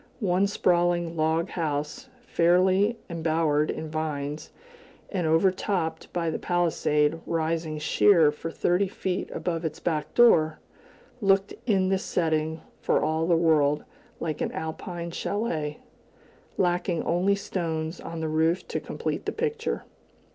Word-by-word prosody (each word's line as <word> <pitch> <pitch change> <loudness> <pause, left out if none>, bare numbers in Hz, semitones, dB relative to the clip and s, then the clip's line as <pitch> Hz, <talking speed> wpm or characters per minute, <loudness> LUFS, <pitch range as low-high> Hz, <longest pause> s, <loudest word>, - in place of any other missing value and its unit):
One 190 -2 +2
sprawling 175 -3 +1
log 160 +2 +1
house, 155 - -3 0.2
fairly 185 +6 +3
embowered 160 -3 +1
in 160 - -3
vines, 150 -1 -3 0.6
and 180 -5 -1
overtopped 180 +1 +1
by 170 -2 -1
the - - -3
palisade 165 -3 +1
rising 160 -1 -1
sheer 160 +1 +4
for 160 +2 -6
thirty 180 +4 +1
feet 185 -1 -3
above 170 -1 -3
its 160 -1 -3
back 155 -3 -2
door, 160 -10 +5 0.6
looked 195 0 +3
in 190 -4 +3
this 190 0 +1
setting 160 -1 0 0.2
for - - +2
all 160 +2 0
the 170 -2 +4
world 150 -3 +3 0.4
like 155 -3 -3
an - - -1
Alpine 170 +2 -5
chalet, 165 -7 -2 0.8
lacking 175 -1 +1
only 185 +4 +2
stones 165 -4 -3
on 165 -1 -6
the 160 - -1
roof 160 +3 +1
to - - -1
complete - - -4
the - - +1
picture. 455 0 -2
165 Hz, 130 wpm, -26 LUFS, 155-185 Hz, 0.8 s, door